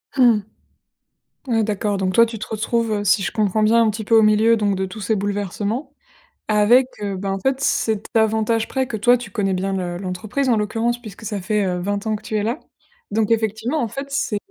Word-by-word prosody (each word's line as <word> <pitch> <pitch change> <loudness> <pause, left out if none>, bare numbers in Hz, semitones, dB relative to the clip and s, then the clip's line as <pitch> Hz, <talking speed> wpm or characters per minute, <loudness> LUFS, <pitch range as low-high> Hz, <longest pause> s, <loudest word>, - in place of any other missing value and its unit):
Mmh. 240 -5 +5 1.1
Ouais, 225 -2 +2
d'accord, 205 -1 -1
donc 190 -1 -1
toi, 230 - +7
tu 230 -1 -6
te 215 - -6
retrouves, 230 +1 -1
heu, 205 -1 -1
si 200 +1 +3
je - - -2
comprends 215 -1 +1
bien, 230 +2 +4
un 220 - +3
petit 215 0 -5
peu 225 - +1
au 220 - +6
milieu, 215 +2 +4
donc 205 -2 0
de 190 - -1
tous 195 +4 -9
ces 215 +2 0
bouleversements 205 - -3 0.6
avec, 215 +5 +5 0.2
heu, 200 -1 -2
ben, 195 +1 -3
en 195 - -2
fait, 265 +4 0
cet 220 -6 0
avantage 220 0 +1
près, 265 -1 -1
que 230 - -4
toi, 245 +4 +4
tu 235 -4 -9
connais 195 -3 0
bien 195 +1 -2
le 180 -2 -3
l'entreprise, 200 +9 -3
en 235 -3 +3
l'occurrence 230 +3 -1
puisque 215 -1 -11
ça 205 -3 -3
fait, 205 +2 0
heu, 180 -1 -1
20 200 +3 -3
ans 220 -1 0
que 210 - -8
tu 220 - -5
es 210 - +1
là. 235 +8 -2 0.5
Donc 220 +1 0
effectivement, 225 +6 0
en 235 - 0
fait, 275 +6 -6
c'est 270 -6 -1
215 Hz, 230 wpm, -21 LUFS, 200-230 Hz, 1.1 s, toi